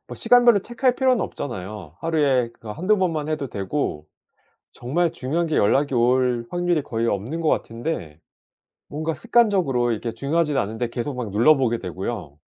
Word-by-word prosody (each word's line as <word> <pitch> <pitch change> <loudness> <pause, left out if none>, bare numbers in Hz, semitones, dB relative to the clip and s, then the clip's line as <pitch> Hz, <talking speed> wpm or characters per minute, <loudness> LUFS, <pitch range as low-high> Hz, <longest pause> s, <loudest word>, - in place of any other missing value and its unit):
뭐 - - -8
시간별로 240 -3 +5
체크할 250 +3 0
필요는 255 -3 +2
없잖아요. 95 - -6
하루에 140 -7 +1
그 115 - -11
1-2 185 - +1
번만 160 -5 -1
해도 150 -4 -2
되고 100 - -3 0.7
정말 165 +7 -1
중요한 160 +7 -1
게 155 - -1
연락이 135 +6 +2
올 125 0 +2
확률이 175 -3 0
거의 115 -4 -2
없는 115 - -2
것 160 - 0
같은데 115 - -3 0.7
뭔가 155 +2 -3
습관적으로 185 - +2
이렇게 115 +1 -3
중요하지는 150 +2 0
않은데 110 +4 -2
계속 125 +3 -4
막 120 -4 -4
눌러 120 +9 +5
보게 120 -3 +1
되고요. 90 -5 -6
135 Hz, 355 characters per minute, -23 LUFS, 115-165 Hz, 0.7 s, 시간별로